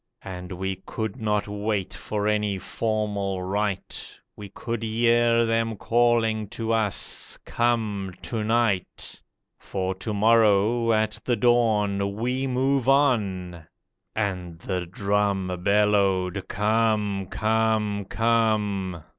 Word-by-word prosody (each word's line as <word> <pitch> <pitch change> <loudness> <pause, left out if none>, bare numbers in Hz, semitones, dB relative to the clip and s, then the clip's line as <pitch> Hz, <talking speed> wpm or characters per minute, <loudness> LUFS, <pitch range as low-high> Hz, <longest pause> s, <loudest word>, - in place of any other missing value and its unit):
And 90 -1 -7
we 95 +1 -3
could 110 +2 -4
not 105 -1 0
wait 105 -2 -2
for 105 -1 -3
any 105 -2 +1
formal 100 -2 -2
rite, 100 0 -3 0.2
We 105 -1 -9
could 115 +3 -5
hear 115 +1 +3
them 115 0 0
calling 115 -2 +2
to 115 0 -2
us, 110 -4 0
'Come 110 -5 0
to 115 -3 -2
night; 110 -4 -1 0.4
For 95 -1 -3
to 95 +4 -5
morrow, 110 +1 +3
at 110 -1 +1
the 120 - +1
dawn, 105 -4 +2
We 125 +4 -1
move 130 0 +1
on!' 100 - +1 0.5
And 90 -5 -2
the 90 0 -3
drum 100 0 0
Bellowed, 100 -2 +2
'Come, 105 -2 +1
come, 110 -2 0
come! 105 -6 0
105 Hz, 110 wpm, -25 LUFS, 100-115 Hz, 0.5 s, hear